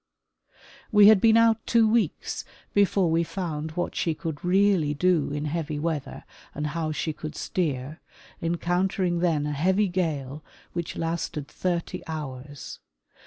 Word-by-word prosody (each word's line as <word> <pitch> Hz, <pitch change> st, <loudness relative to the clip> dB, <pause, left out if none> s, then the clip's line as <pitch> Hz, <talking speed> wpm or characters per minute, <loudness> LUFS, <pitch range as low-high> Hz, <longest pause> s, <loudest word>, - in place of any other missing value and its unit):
We 210 Hz, -1 st, +8 dB
had 215 Hz, -3 st, +6 dB
been 225 Hz, 0 st, +6 dB
out 230 Hz, -1 st, +4 dB
two 230 Hz, -1 st, +4 dB
weeks 225 Hz, +1 st, 0 dB, 0.3 s
before 195 Hz, -3 st, +3 dB
we 165 Hz, +1 st, +3 dB
found 160 Hz, -2 st, -4 dB
what 175 Hz, +2 st, -3 dB
she 165 Hz, -2 st, 0 dB
could 155 Hz, -2 st, -5 dB
really 180 Hz, -5 st, +3 dB
do 175 Hz, -2 st, +2 dB
in 145 Hz, +1 st, -3 dB
heavy 155 Hz, -1 st, -2 dB
weather 155 Hz, -2 st, -3 dB, 0.3 s
and 150 Hz, -, -2 dB
how 155 Hz, +1 st, -2 dB
she 155 Hz, +1 st, -2 dB
could 155 Hz, 0 st, -7 dB
steer, 150 Hz, -3 st, -2 dB, 0.4 s
encounter 175 Hz, +3 st, 0 dB
ing 175 Hz, -1 st, +1 dB
then 165 Hz, -4 st, +1 dB
a 150 Hz, -, -2 dB
heavy 190 Hz, +7 st, +2 dB
gale 155 Hz, -5 st, -2 dB, 0.3 s
which 170 Hz, -1 st, -4 dB
lasted 165 Hz, -3 st, -3 dB
thirty 175 Hz, -2 st, -2 dB
hours. 145 Hz, -3 st, -7 dB
165 Hz, 145 wpm, -26 LUFS, 150-185 Hz, 0.4 s, We